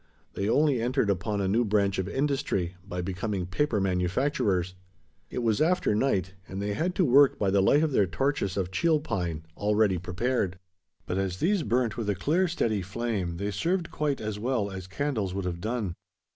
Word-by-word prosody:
They 100 +2 -1
only 145 -2 +3
entered 120 -3 +1
upon 100 +2 -1
a 95 - 0
new 110 +5 +3
branch 100 -2 +1
of 95 +1 -2
industry: 135 -10 -1
by 90 -2 -4
becoming 95 +1 -2
paper 110 +5 0
manufacturers. 95 +1 0 0.6
It 125 - -3
was 110 +1 +2
after 180 -5 +2
night; 100 -6 +1
and 95 - -6
they 100 0 -1
had 175 - -1
to 185 - +3
work 140 +1 +6
by 100 -2 +1
the 100 0 +4
light 145 +10 +4
of 155 - +1
their 100 -7 +3
torches 100 -1 -1
of 95 -2 -1
cheel 160 - +2
pine, 85 - -3
already 105 -3 +2
prepared. 95 +1 -1 0.5
But 95 - -2
as 95 -2 -2
these 195 - +2
burnt 120 -2 0
with 110 -3 -2
a 100 - +1
clear 165 - +1
steady 110 - 0
flame, 95 -3 -3
they 100 +3 -2
served 170 - -1
quite 150 -3 -1
as 105 -1 -4
well 115 -3 -1
as 95 -1 -7
candles 105 -3 -2
would 100 -2 -2
have 85 -1 -3
done. 110 -4 -2
105 Hz, 190 wpm, -28 LUFS, 95-135 Hz, 0.6 s, work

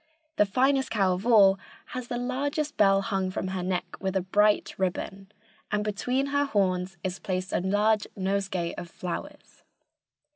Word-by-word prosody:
The 210 - +4
finest 265 +5 +2
cow 195 -4 +2
of 185 +6 -4
all 195 -5 +6 0.3
has 255 -1 -5
the 240 - -3
largest 285 +5 -2
bell 195 -1 +4
hung 195 -2 -1
from 185 0 -3
her 190 -1 -3
neck 180 0 -1 0.2
with 190 0 -2
a 190 - +2
bright 205 +3 +2
ribbon, 195 +1 -3 0.4
and 210 0 +1
between 245 +6 -1
her 285 0 +3
horns 190 -6 0
is 185 0 -3
placed 185 -2 -3
a - - +2
large 205 +3 +2
nosegay 190 -2 -1
of 175 - -8
flowers. 240 - -7
195 Hz, 160 wpm, -27 LUFS, 185-240 Hz, 0.4 s, all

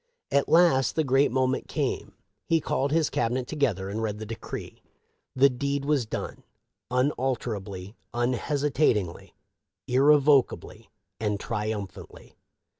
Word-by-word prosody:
At 140 - +2
last 160 -6 +4
the 160 - +2
great 135 0 +3
moment 130 0 0
came. - - -2 0.3
He 165 - +3
called 140 -2 -1
his 160 -1 +2
Cabinet 120 +2 0
together 125 - -1
and 105 +3 -3
read 105 -2 -2
the 110 - -6
decree. 115 +1 -7 0.5
The 135 +1 +6
.deed 140 +2 -2
was 140 -6 +1
done, - - -5 0.5
unalterably, 120 -7 -2 0.2
unhesitatingly, 125 - 0 0.5
irrevocably, 135 -4 +3 0.3
and 105 -2 -1
triumphantly. 105 -3 -5
130 Hz, 115 wpm, -27 LUFS, 110-140 Hz, 0.5 s, The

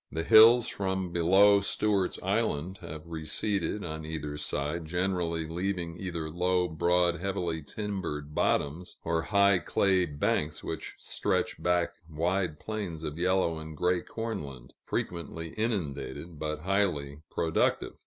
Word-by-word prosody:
The 80 - -2
hills, 115 +4 +8
from 95 -2 -2
below 95 +4 +6
Stewart's 100 -2 +1
Island, 85 +7 0
have 80 -2 -8
receded 85 +5 -2
on 80 -1 -5
either 75 -2 -4
side, 75 +3 -3
generally 90 -2 -1
leaving 85 0 -2
either 85 -4 -3
low, 90 +2 +1
broad, 85 +1 +2
heavily 90 -4 -2
timbered 80 -5 -4
bottoms, 75 +4 0
or 80 0 0
high 100 0 +4
clay 95 +2 +2
banks 75 +1 -1
which - - -5
stretch - - -1
back 90 -1 +1 0.2
wide 85 0 -1
plains 100 -7 -4
of 75 +1 -4
yellow 90 -2 +2
and 80 -1 -8
gray 90 +2 +2
corn 115 -6 -4
land 65 -3 -10
frequently 80 -1 -3
inundated, 80 - -3
but 75 0 -3
highly 85 -7 0
productive. 80 0 +1
85 Hz, 130 wpm, -29 LUFS, 80-95 Hz, 0.2 s, hills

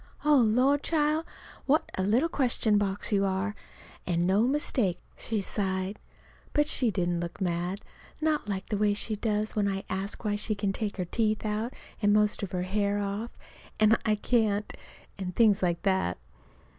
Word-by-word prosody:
"Oh, 300 -1 +6
la! 250 +4 +4
child, 305 +1 +1 0.4
what 295 +3 +2
a - - -1
little 225 - +3
question 240 -8 +2
box 200 +1 -1
you 200 -1 +3
are, 195 +2 -1 0.5
an' 175 -1 +1
no 200 +6 +3
mistake," 255 -9 0 0.2
she 220 -3 -2
sighed. 190 0 -2 0.5
But 295 - +3
she 255 -5 +2
didn't 175 -4 0
look 170 0 -5
mad 180 +1 -2 0.4
not 305 -7 0
like 195 -1 -3
the 210 - -1
way 205 -1 +3
she 215 +1 -1
does 210 0 -1
when 205 -2 +2
I 195 0 -2
ask 195 +4 -3
why 205 -1 +1
she 215 +1 -1
can 200 -1 -1
take 210 0 -3
her 180 - -1
teeth 215 +3 0
out 215 +3 -2 0.3
and 205 -1 +4
most 210 0 +2
of 195 -3 -4
her 180 -2 -1
hair 200 +2 0
off 205 +3 -4 0.4
and 215 +1 +6
I 215 -1 +2
can't; 210 -2 +1 0.5
and 180 -2 -4
things 215 -4 +4
like 175 -2 0
that. 190 - +1
205 Hz, 175 wpm, -28 LUFS, 190-225 Hz, 0.5 s, Oh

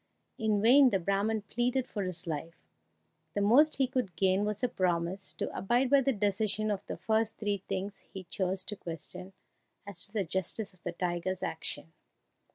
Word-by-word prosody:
In 215 -2 +1
vain 260 +3 +8
the 200 - +2
Brahman 200 +4 0
pleaded 245 +4 0
for 205 - -4
his 180 -1 -4
life; 165 0 -4 0.8
the - - +1
most 270 +10 +5
he 270 - +3
could 250 - -2
gain 190 +1 +2
was 210 +3 -3
a - - +4
promise 185 -3 -1
to - - -4
abide 240 +7 +1
by 280 -1 +7
the 270 - +2
decision 210 0 +1
of 200 -1 -2
the - - -4
first 220 0 0
three 205 -2 -1
things 195 +1 -3
he 190 - -7
chose 185 +1 -2
to 210 - -5
question 180 +2 -7 0.5
as 195 -3 -4
to - - -22
the 210 -2 0
justice 190 +4 -2
of 180 - -26
the 175 - -4
tiger's 180 +1 -2
action. - - -3
200 Hz, 180 wpm, -31 LUFS, 185-220 Hz, 0.8 s, vain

